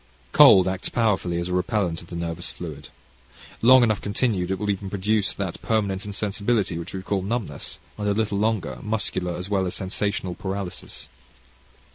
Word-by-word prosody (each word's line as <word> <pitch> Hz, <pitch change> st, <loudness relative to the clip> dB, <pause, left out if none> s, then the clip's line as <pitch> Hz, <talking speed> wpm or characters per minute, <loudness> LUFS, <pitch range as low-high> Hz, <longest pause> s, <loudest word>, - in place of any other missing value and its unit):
Cold 95 Hz, -1 st, +8 dB
acts 95 Hz, 0 st, -1 dB
powerfully 100 Hz, -7 st, +1 dB
as 85 Hz, -, -2 dB
a -, -, -2 dB
repellant 90 Hz, -2 st, 0 dB
of 85 Hz, -, -14 dB
the 85 Hz, -, -7 dB
nervous 85 Hz, 0 st, -4 dB
fluid. 75 Hz, -4 st, -8 dB, 0.7 s
Long 130 Hz, +2 st, +8 dB
enough 110 Hz, -4 st, +2 dB
continued 100 Hz, -3 st, 0 dB
it 95 Hz, -, 0 dB
will 105 Hz, +2 st, 0 dB
even 100 Hz, 0 st, -4 dB
produce 100 Hz, +1 st, +1 dB
that 95 Hz, -4 st, -4 dB
permanent 100 Hz, -3 st, 0 dB
insensibility 100 Hz, -2 st, -1 dB
which 85 Hz, -, -6 dB
we 95 Hz, -, -5 dB
call 100 Hz, 0 st, -1 dB
numbness, 100 Hz, -, -3 dB, 0.2 s
and 105 Hz, -, -1 dB
a 100 Hz, -, +3 dB
little 105 Hz, -2 st, 0 dB
longer, 100 Hz, -, 0 dB
muscular 95 Hz, -5 st, -2 dB
as 90 Hz, +2 st, -5 dB
well 95 Hz, -2 st, +1 dB
as 90 Hz, -, -4 dB
sensational 100 Hz, 0 st, -2 dB
paralysis. 95 Hz, 0 st, -5 dB
95 Hz, 170 wpm, -24 LUFS, 90-105 Hz, 0.7 s, Cold